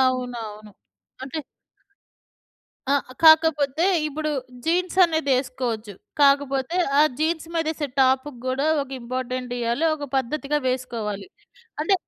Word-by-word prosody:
అవునవును. 235 -5 -2 0.5
అంటే 275 +4 -4 1.5
ఆ! 280 - +4 0.3
కాకపోతే 315 -1 +5 0.2
ఇప్పుడు 305 +1 -3 0.3
జీన్స్ 360 +2 0
అనేదేసువచ్చు. 255 - -1 0.3
కాకపోతే 275 +2 +3 0.2
ఆ - - +8 0.2
జీన్స్ 320 +1 0
మీదేసే 315 -2 -1
టాప్‌కి 260 0 +2
గూడా 265 +3 0 0.2
ఒక 275 - -11
ఇంపార్టెంట్ 255 +1 -4
ఇయ్యాలి. 235 +6 0
ఒక 290 - -6
పద్ధతిగా 285 +3 -1
వేసుకోవాలి. 235 - -3 0.5
అంటే 360 +6 +3
270 Hz, 100 wpm, -23 LUFS, 250-310 Hz, 1.5 s, ఆ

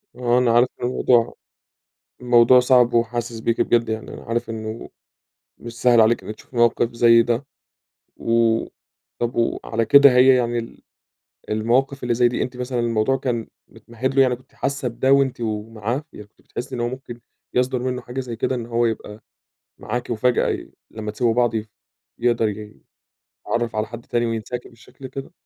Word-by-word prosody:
آه، 125 0 +1
أنا 125 -2 +3
عارف 120 +2 +4 0.2
الموضوع 120 -1 +2 0.9
الموضوع 120 0 +6
صعب 125 -1 +4
وحاسس 120 0 -1
بيكِ 115 +1 0
بجد 115 -1 +2
يعني 110 0 -5
أنا - - -10
عارف 115 0 -3
إنه 110 0 -6 0.7
مش 115 0 -10
سهل 120 -2 +5
عليكِ 110 +1 +3
إنِك 110 - -6
تشوفي 120 - -16
موقف 120 0 +2
زي 115 0 +5
ده. 120 +3 -2 0.7
و 115 -1 +2 0.6
طب 120 +1 -2
وعلى 115 -1 -1
كده 140 +3 +7
هي 130 +1 +6
يعني 120 -1 0
ال 115 - -8 0.7
المواقف 125 +6 0
اللي 120 -1 0
زي 120 0 +4
دي 120 - -2
أنتِ 125 0 -4
مثلًا 125 -1 -3
الموضوع 115 +2 +1
كان 120 -4 -3 0.2
متمهد 125 +3 -5
له؟ 135 - +6
يعني 125 -2 +2
كنتِ 130 - -25
حاسة 135 -2 -2
بده 130 +3 +1
وأنتِ 135 -3 +2
و 110 -1 -3
معاه؟ 115 +6 -3
يعني 105 - -11
كنتِ 105 - -31
بتحسي 130 +2 -7
إن 120 - -4
هو 120 - 0
ممكن 125 -2 -8 0.3
يصدر 125 +1 +1
منه 125 0 -3
حاجة 125 +2 -5
زي 120 -3 -6
كده 130 - -1
إن 120 -2 -4
هو 120 0 +1
يبقى 110 -1 -5 0.6
معاكِ 125 0 -4
وفجأة 120 +2 +1
ي - - -4 0.2
لمّا 110 -1 -6
تسيبوا 115 +1 0
بعض 120 -2 +2
يف 110 0 -3 0.5
يقدر 115 -2 +1
ي 105 0 -8 0.7
يتعرف 120 -1 -1
على 110 0 -1
حد 115 +1 -10
تاني 120 0 0
وينساكِ 115 +2 -4
بالشكل 125 +3 -13
كده؟ 135 +1 -8
120 Hz, 175 wpm, -22 LUFS, 115-125 Hz, 0.9 s, كده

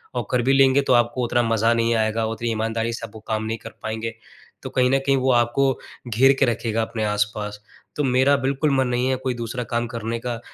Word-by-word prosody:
और - - -2
कर 125 - +2
भी 135 +3 +3
लेंगे 135 0 +5
तो 135 - +1
आपको 120 +1 +2
उतना 120 +1 +1
मज़ा 115 0 +2
नहीं 115 0 +1
आएगा 110 0 0
उतनी 115 +1 -3
ईमानदारी 115 +1 -1
से 115 - -5
आप - - -21
वो 110 - -8
काम 110 -1 -1
नहीं 115 +1 -2
कर - - -10
पाएँगे। 110 +1 -4 0.5
तो - - -5
कहीं 125 -1 +2
न 135 - +3
कहीं 135 0 +3
वो 130 0 +2
आपको 125 +3 +2 0.3
घेर 130 +4 +4
के 135 - +5
रखेगा 115 -1 -1
अपने 110 0 -3
आस-पास। 105 0 -2 0.3
तो 150 - -1
मेरा 130 +2 +3
बिल्कुल 140 +2 0
मन 130 -1 +2
नहीं 125 +1 0
है 130 - +2
कोई 130 -1 0
दूसरा 120 +1 -4
काम 120 0 0
करने 115 0 -4
का 120 -1 -4
120 Hz, 235 wpm, -22 LUFS, 115-130 Hz, 0.5 s, लेंगे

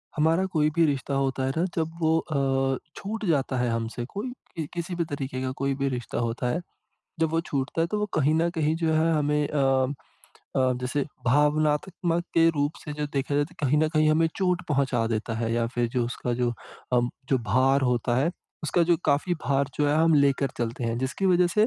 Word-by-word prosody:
हमारा 160 +4 +3
कोई 150 -2 +3
भी 170 -1 +5
रिश्ता 140 -1 -1
होता 135 -1 0
है 135 - 0
न 170 - +2
जब 160 -1 0
वो 160 0 +3
अ, 135 -4 0 0.2
छूट 220 +2 -4
जाता 140 -6 +1
है 125 0 +1
हमसे 115 +1 -3
कोई, 205 - -5 0.4
किसी 175 +1 -4
भी 170 -1 0
तरीके 135 -3 -4
का 130 0 -2
कोई 140 0 +1
भी 140 - +2
रिश्ता 125 -3 -4
होता 120 +1 -1
है, 165 +8 -1 0.6
जब 160 -1 +2
वो 165 +1 +1
छूटता 140 +3 -2
है 165 - +3
तो 210 +5 -2
वो 210 - 0
कहीं 155 0 +3
न 165 +2 +2
कहीं 160 -2 0
जो 165 -1 +1
है 160 +1 +3
हमें 150 -1 +1
अ 135 -2 +2 0.6
अ, 130 -1 +3
जैसे 130 +3 -1 0.2
भावनात्मक 155 +5 +2
के 165 0 +6
रूप 145 0 0
से 150 - -5
जो 150 0 -3
देखा 140 0 -1
जाए 145 0 +3
तो 170 +5 -15
कहीं 145 +2 +3
न 155 0 +3
कहीं 155 -1 +3
हमें 160 +1 +3
चोट 180 -2 +1
पहुँचा 135 -5 +1
देता 110 +1 -3
है 115 0 -1
या 115 0 +1
फिर 120 -1 +1
जो 120 0 0
उसका 120 0 -3
जो 120 - +2 0.4
अ, 125 - +5 0.3
जो 130 - +3
भार 135 +2 +4
होता 120 0 0
है 140 +6 +2 0.3
उसका 165 +3 +2
जो 170 - +6
काफ़ी 150 +5 +2
भार 140 +1 +2
जो 145 -1 +1
है 145 - +2
हम 165 0 +4
लेकर 140 -1 +3
चलते 120 +1 -2
हैं 115 0 -1
जिसकी 130 +9 -1
वज़ह 180 -1 +4
से, 210 +5 +3
145 Hz, 215 wpm, -26 LUFS, 130-165 Hz, 0.6 s, के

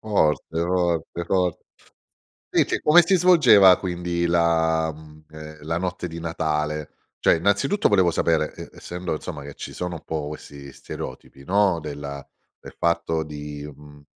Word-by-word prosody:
Forte 80 -5 0
forte 85 -1 -1
fort 90 -1 0 0.9
Invece, - - +1
come 165 +3 +6
si 185 +3 +3
svolgeva, 130 - +7
quindi, 85 -1 -2
la, 80 -1 +2
mhmm, 75 0 -15
ehm, 75 0 -10
la 80 +2 -1
notte 90 -1 -3
di 85 0 -8
Natale? 75 -2 -2 0.3
Cioè, - - +4
innanzitutto, 100 - +1
volevo 95 -4 +4
sapere, 80 -2 0
ehm, - - -9
essendo, 90 0 -6
insomma, 75 -1 -6
che 70 0 -9
ci - - -8
sono 90 -1 -4
un 80 - -13
po' 75 -2 -4
questi 70 -2 -10
stereotipi, 70 +1 -9
no, 95 0 +2
della 70 -2 -7 0.3
del - - -12
fatto 85 -1 0
di, 75 -1 -7
mhmm 75 +1 -16
80 Hz, 150 wpm, -23 LUFS, 75-90 Hz, 0.9 s, svolgeva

